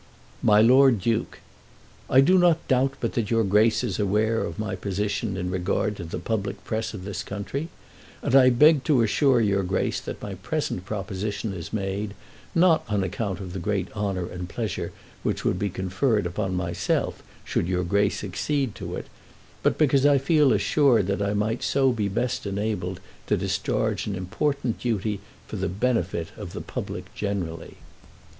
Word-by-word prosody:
MY 105 0 +5
LORD 130 -1 +6
DUKE, 115 +2 -1 0.7
I 130 - +6
do 185 +7 +5
not 175 -2 +3
doubt 135 +1 +2
but 115 - -2
that 110 -3 -1
your 115 -1 +3
Grace 105 +4 +3
is 110 -6 -2
aware 105 +3 +1
of - - -5
my 110 -1 -2
position 100 +1 -2
in 90 -1 -2
regard 95 +3 0
to 90 - -6
the 80 - -5
public 100 -2 -3
press 110 0 -3
of 95 -3 -8
the 100 - -5
country, 105 +11 -4 0.5
and - - -1
I 130 -1 +8
beg 145 +3 +5
to 130 -6 +4
assure 130 +3 +3
your 100 -2 +2
Grace 95 0 -1
that - - -6
my 100 - -6
present 95 - -3
proposition 100 +1 -3
is 85 -4 -7
made, 100 0 -3 0.4
not 170 -1 +5
on 105 -2 +1
account 95 0 -3
of 90 -3 -7
the 95 - -4
great 95 +2 -2
honour 100 -4 -1
and 90 0 -6
pleasure 110 -1 -3 0.3
which - - -2
would - - +1
be 100 - 0
conferred 95 +4 0
upon 95 +2 -2
myself 85 -1 -1 0.2
should - - -1
your 90 0 0
Grace 100 +3 +1
accede 120 +6 -1
to - - -6
it, - - -5 0.6
but - - +2
because 140 -3 +3
I 145 -1 +6
feel 145 0 +4
assured 130 -9 +3
that 100 +1 -1
I 100 +1 0
might 110 +3 0
so 135 -1 +2
be 110 -4 -1
best 115 +2 -2
enabled 100 -2 -2 0.3
to - - +2
discharge - - -1
an 100 - -2
important 120 +7 -1
duty 105 -3 -1 0.3
for - - -5
the - - -1
benefit 95 -5 -1
of - - -7
the - - -5
public - - -6
generally. 95 -5 -4
105 Hz, 175 wpm, -25 LUFS, 95-125 Hz, 0.7 s, I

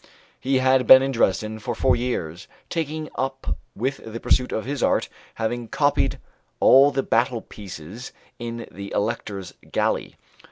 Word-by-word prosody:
He 135 0 +1
had 130 0 +3
been 130 0 +10
at 135 - 0
Dresden 110 -2 0
for - - -4
four 130 - +3
years, 100 -8 -3 0.2
taken 155 -2 -2
up 135 +1 -2 0.2
with 130 +6 -2
the 115 +1 -7
pursuit 125 +1 +2
of 110 - -2
his 140 0 -3
art, - - +2 0.3
having 115 +1 -2
copied 145 +4 +1 0.4
all 135 +2 +7
the 135 -1 -1
battle 120 0 +1
pieces 100 +3 -9 0.3
in 115 0 -5
the 100 +1 -8
Elector's 100 -3 -3 0.2
Galley. - - 0
120 Hz, 150 wpm, -23 LUFS, 110-135 Hz, 0.4 s, been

